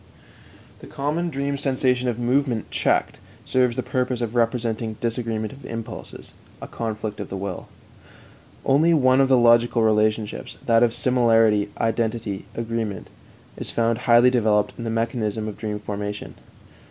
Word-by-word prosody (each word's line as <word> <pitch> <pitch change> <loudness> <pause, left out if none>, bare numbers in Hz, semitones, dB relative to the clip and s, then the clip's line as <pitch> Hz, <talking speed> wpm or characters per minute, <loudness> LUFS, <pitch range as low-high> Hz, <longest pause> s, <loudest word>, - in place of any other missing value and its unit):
The - - -12
common 155 +5 -2
dream 140 -1 -2
sensation 130 -2 +1
of 115 - -2
movement 120 -1 0
checked - - 0 0.3
serves 125 -2 +2
the 130 - -2
purpose 125 -1 -1
of 120 -2 -3
representing 115 -2 -1
disagreement 115 -2 -2
of 135 - -14
impulses 115 -1 -8 0.3
a - - -8
conflict 110 -2 -4
of - - -6
the 95 - -4
will. 95 -1 -5 1.0
Only 155 +5 +4
one 130 -2 +4
of 135 - +2
the 130 - +5
logical 120 0 +4
relationships 110 0 0
that 115 -1 +4
of 120 -1 +3
similarity, 115 -4 +3
identity, 110 -3 -1
agreement 115 -3 -3 0.5
is - - -6
found 115 -1 0
highly 120 +2 +7
developed 110 -4 +2
in 115 - -7
the - - -2
mechanism 115 -1 -2
of 105 - -5
dream 105 -2 -4
formation. 105 0 -5
115 Hz, 145 wpm, -23 LUFS, 110-125 Hz, 1.0 s, highly